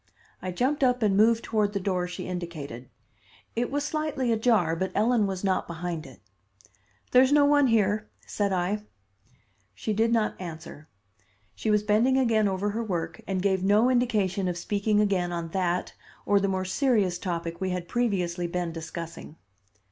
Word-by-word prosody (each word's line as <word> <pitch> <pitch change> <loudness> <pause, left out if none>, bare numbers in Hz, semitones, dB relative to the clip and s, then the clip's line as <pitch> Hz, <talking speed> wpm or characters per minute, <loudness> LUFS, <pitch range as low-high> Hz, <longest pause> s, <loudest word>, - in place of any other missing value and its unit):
I 185 - -4
jumped 260 +10 0
up 250 -2 +2
and 200 -2 +3
moved 225 +3 +4
toward 210 -2 0
the 200 - -1
door 185 -2 -1
she 180 - -6
indicated. 155 -9 -6 0.7
It 240 +1 0
was 285 +1 -1
slightly 295 -5 -1
ajar, 220 -7 +2
but 190 +3 -2
Ellen 220 0 +3
was 190 -1 -4
not 190 -1 0
behind 170 -2 -5
it. 130 - -15 0.9
"There's 260 +2 +5
no 290 -1 +5
one 290 -1 +4
here," 215 -2 +1 0.2
said 205 -1 -1
I. 190 +3 0 0.9
She 215 - -2
did 225 +2 +2
not 225 -2 +2
answer. 160 -3 -9 0.6
She 220 - -3
was 210 -1 +3
bending 225 +5 +3
again 225 -5 +3
over 195 +2 -1
her 230 +3 -2
work, 180 -6 -3
and 190 -1 -1
gave 190 -2 +1
no 210 +6 +4
indication 205 -6 +1
of 175 -1 -2
speaking 205 +3 0
again 190 -4 +1
on 170 -1 -4
that 180 0 -1 0.3
or 205 0 +4
the 200 - 0
more 190 -1 -1
serious 200 -4 +1
topic 170 -1 -4
we 190 - 0
had 180 -1 -3
previously 180 -7 -1
been 175 0 -2
discussing. 165 -1 -7
200 Hz, 170 wpm, -27 LUFS, 175-225 Hz, 0.9 s, There's